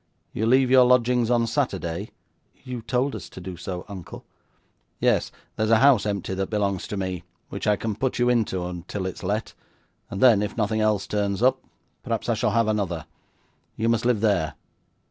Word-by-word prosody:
You 110 - -1
leave 130 +1 +4
your 130 -1 +8
lodgings 125 -1 +3
on 120 -1 +3
Saturday?' 110 - -2 0.5
'You 125 -2 -5
told 130 +4 -1
us - - -8
to - - -10
do 90 0 -7
so, 90 +1 -6
uncle.' 95 -5 -9 0.7
'Yes; - - +2 0.2
there 110 - 0
is - - -1
a 115 - +6
house 125 -5 +5
empty 100 -2 -2
that 95 0 -2
belongs 100 -3 -1
to 105 - -4
me, 95 -2 -3 0.3
which - - -5
I 105 - +4
can 110 +1 -3
put 130 +4 -1
you 120 - +2
into 90 -7 0
till 100 -2 -4
it 95 - -3
is - - -11
let, 105 +4 -2 0.6
and 95 - -5
then, 115 -4 +6
if 105 - -3
nothing 110 0 0
else 105 -2 +1
turns 100 +1 -1
up, 130 - +3 0.4
perhaps - - -3
I - - +4
shall - - +1
have 115 0 +2
another. 95 -7 -1 0.7
You 115 +1 0
must 115 +1 +1
live 120 -4 +2
there. 100 -8 +1
105 Hz, 195 wpm, -24 LUFS, 95-120 Hz, 0.7 s, your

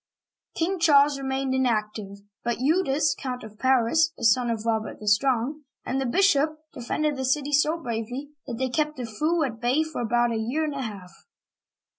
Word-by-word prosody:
King 360 +3 -1
Charles 285 -3 +5
remained 265 0 -2
inactive, 215 -5 -1 0.2
but 240 0 -1
Eudes 295 0 +2
(ed), - - -15
Count 250 -2 -4
of 215 -1 -12
Paris 265 +6 +3
(a - - -9
son 235 +2 +4
of 225 -1 -3
Robert 220 -1 -1
the 210 - -9
Strong), 255 +6 +2 0.2
and 270 +1 -1
the 265 - -1
bishop, 310 -1 +3 0.2
de 250 - -8
fended 300 +5 -1
the 265 - -3
city 280 +2 0
so 300 +3 +3
bravely 245 +1 -5 0.2
that 240 -3 -4
they 260 +1 -1
kept 300 +3 -1
the 250 - -4
foe 310 +9 0
at 230 -5 -4
bay 255 +6 +2
for 315 -5 -5
about 240 +1 +1
a 225 - -1
year 245 +8 -1
and 305 -2 -2
a 275 - -4
half. 200 -7 -7
260 Hz, 195 wpm, -25 LUFS, 230-300 Hz, 0.2 s, Charles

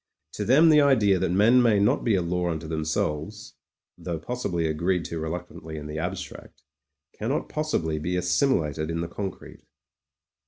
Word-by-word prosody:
To 105 - -3
them 150 +8 +6
the 150 -1 +6
idea 110 -9 +4
that - - 0
men 110 +8 +5
may 115 -4 +4
not 100 - +2
be 115 -4 +2
a 90 - +1
law 90 +1 -1
unto 80 -1 -4
them 80 0 -2
selves 80 +6 -3 0.3
— - - -27
^though 85 -3 -4
possibly 90 -4 -2
agreed 85 +3 0
to 85 - -5
reluctantly 80 -1 -6
in 75 - -7
the 75 +1 -5
abstract 90 +2 -7 0.3
— 70 +1 -61
cannot 120 +7 -2
possibly 85 - -1
be 90 +4 -2
assimilated 85 - 0
in 85 0 -2
the 85 - -3
con 95 +3 -4
crete. - - -14
90 Hz, 185 wpm, -25 LUFS, 80-105 Hz, 0.3 s, them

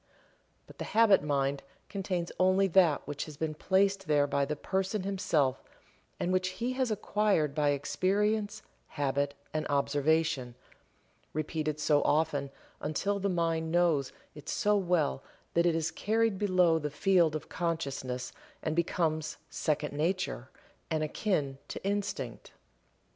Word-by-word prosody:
But - - -16
the - - -2
"Habit 220 -4 +6
Mind" 140 -1 0 0.3
contains 185 -3 -3
only 185 +1 +4
that 170 -5 +4
which 145 0 -3
has 150 -2 -10
been 160 0 -2
placed 195 +4 +1
there 145 -2 +4
by 140 0 +1
the 150 +2 -2
person 190 +5 -1
himself 165 -9 +1 0.6
and 180 - 0
which 185 0 +2
he 245 +2 -1
has 260 -1 0
acquired 205 -7 +1
by 145 -1 +2
experience, 205 +8 0 0.2
habit, 140 -1 -1 0.2
and 155 0 -1
observation, 145 -1 +1 0.8
repeated 155 0 -2
so 150 -1 +3
often 150 -3 +1 0.3
until 200 +7 -1
the 200 +1 0
mind 165 -2 0
knows 165 -6 +2 0.2
it 150 0 -10
so 210 0 +2
well 175 -8 +1 0.3
that 170 +1 +3
it 165 - +2
is 165 +1 0
carried 220 0 +1
below 180 -5 +3
the 150 -1 -3
field 165 +1 +3
of 155 - -5
consciousness 140 -7 -3 0.3
and 155 - -1
becomes 155 -2 0
"second 150 -1 -1
nature," 155 - -1 0.4
and 155 -1 0
akin 150 -5 -1
to - - -7
Instinct. 195 - -3
160 Hz, 135 wpm, -30 LUFS, 145-190 Hz, 0.8 s, Habit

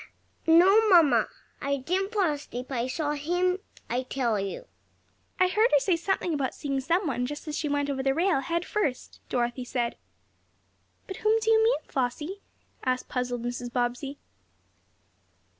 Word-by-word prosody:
"No, 385 +7 +6
mamma. 295 - +6 0.3
I 280 0 0
didn't 370 +9 -1
fall 405 -5 +2
asleep. 260 -3 -7
I 245 -1 -1
saw 295 +3 -1
HIM, 355 +5 0 0.3
I 250 - -1
tell 250 -4 -1
you." 195 - -4 0.7
"I 370 - +5
heard 430 +5 +3
her 290 - +6
say 360 +5 +2
something 345 0 -1
about 275 -3 -1
seeing 275 -2 -2
some 345 +7 +1
one, 250 -4 -1
just 295 +3 -7
as 300 - -3
she 310 -2 -2
went 285 0 0
over 275 -2 -2
the 270 0 +1
rail, 340 -2 +2
head 335 +6 -2
first," 300 -12 -2
Dorothy 245 +1 -1
said. 245 -1 -2 1.1
"But 380 - -7
whom 435 +1 +3
do 445 0 +1
you 445 0 +5
mean, 470 +3 +3
Flossie?" 295 +9 -3 0.4
asked 255 -1 -1
puzzled 245 -2 -2
Mrs. 245 0 -4
Bobbsey. 250 +3 -2
290 Hz, 160 wpm, -27 LUFS, 255-365 Hz, 1.1 s, No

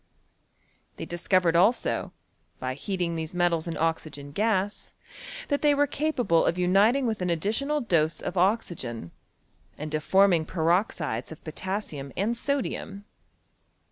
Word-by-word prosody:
They - - -6
discovered 175 0 +1
also, 200 +8 +2 0.5
by 130 0 -3
heating 175 +4 -2
these 160 +1 -5
metals 175 -2 +1
in 165 - -3
oxygen 155 -3 -2
gas, 205 +2 -1 0.5
that 285 -1 +1
they 295 -1 +4
were 290 +1 +4
capable 275 - +1
of 170 - +1
uniting 200 +9 +3
with 220 -4 -1
an 180 - 0
additional 225 - 0
dose 160 -7 +1
of 180 - -5
oxygen, 175 - -1 0.7
and 150 +1 -6
of 155 -1 -1
forming 190 -3 +4
per 160 0 0
oxides 170 - -1
of 160 - -11
potassium 155 -4 -5
and 215 +5 +1
sodium. 235 -6 -3
180 Hz, 135 wpm, -27 LUFS, 160-215 Hz, 0.7 s, they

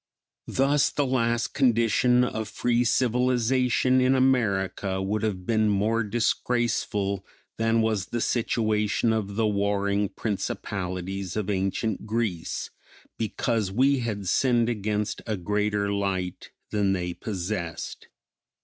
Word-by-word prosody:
Thus 140 +2 +2
the 145 - 0
last 120 -3 +1
condition 125 0 +3
of 110 -3 -2
free 120 0 +1
civilization 125 +1 +2
in 130 +1 +4
America 100 -7 +1
would 100 +2 -1
have 100 -5 -2
been 110 -1 +2
more 110 +3 +1
disgraceful 105 -3 0 0.4
than 115 0 +2
was 110 -4 0
the 120 - -3
situation 110 -1 +1
of 100 -3 -2
the 110 +1 +1
warring 100 -1 +1
principalities 95 -2 -4
of 105 -1 -1
ancient 100 +2 -1
Greece, 110 -7 -2 0.5
because 110 -2 -1
we 135 +6 +3
had 105 -5 -3
sinned 120 +3 +2
against 105 -1 -2
a 110 -2 -1
greater 105 +2 0
light 95 -3 -2 0.2
than 100 -2 +2
they 90 -2 -2
possessed. 90 -3 -5
110 Hz, 115 wpm, -26 LUFS, 100-120 Hz, 0.5 s, in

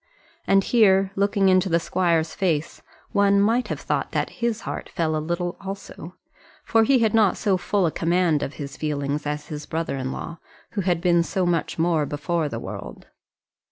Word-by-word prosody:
And 195 0 +4
here, 195 -4 +4
looking 200 0 +2
into 185 0 +3
the 170 0 +3
squire's 165 -2 0
face, 165 -5 -1 0.3
one 200 0 +3
might 230 +5 +2
have - - -4
thought - - -2
that - - -1
his 235 -2 0
heart - - -6
fell 160 -2 -1
a 155 - -1
little 175 +2 -3
also; 195 -3 -8 0.5
for 225 0 +4
he 265 +4 +4
had 225 -3 +2
not 215 -4 +4
so 200 -3 +1
full 190 +1 0
a 165 - +1
command 170 -2 +1
of 135 - -3
his 140 -2 -7
feelings 145 -1 -2
as 150 0 -4
his 150 -1 -6
brother 160 -3 -2
in 130 0 -3
law, 170 0 -6 0.3
who 205 - -2
had 175 -2 0
been 170 -1 +4
so 180 +2 -1
much 175 -2 -1
more 165 -3 +1
before 150 +2 -1
the - - -5
world. - - -8
175 Hz, 190 wpm, -24 LUFS, 155-195 Hz, 0.5 s, And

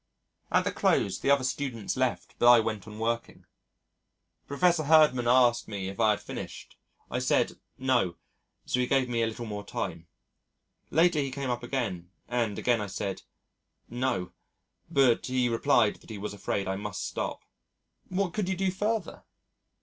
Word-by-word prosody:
At - - +4
the - - -1
close - - +1
the - - -1
other 140 -2 +4
students 130 -4 -2
left 130 -1 -1
but 120 - +6
I 120 - +8
went 110 -2 -3
on 105 0 -9
working. 115 +1 -3 1.0
Prof. 140 +3 -7 0.2
Herdman 155 -5 +4
asked 120 -1 +4
me 100 -3 -4
if 100 - -9
I 110 -1 +4
had 105 - +2
finished. - - -8 0.4
I - - 0
said - - +1 0.2
"No," 125 -9 +1 0.5
so 125 - 0
he 125 - +1
gave 135 -1 +2
me 120 -1 -1
a 115 - +2
little 115 +1 -5
more 105 -2 -5
time. 85 -4 -5 0.8
Later 165 +1 +3
he 140 -1 0
came 135 -1 -3
up 120 0 -2
again, 110 -9 -3 0.2
and 115 -4 -1
again 120 -3 +1
I 105 - -3
said 95 0 -4 0.7
"No," 120 -7 -1 0.6
but 130 -4 +3
he 130 -1 +1
replied 115 -1 +3
that - - -19
he 110 - -6
was 105 +1 -5
afraid 100 -1 -2
I 95 0 -1
must 100 - -4
stop. - - -4 0.6
"What 185 -1 -1
could 210 -4 -1
you 190 - 0
do 190 +1 0
further?" 205 0 -2
120 Hz, 170 wpm, -28 LUFS, 105-135 Hz, 1.0 s, I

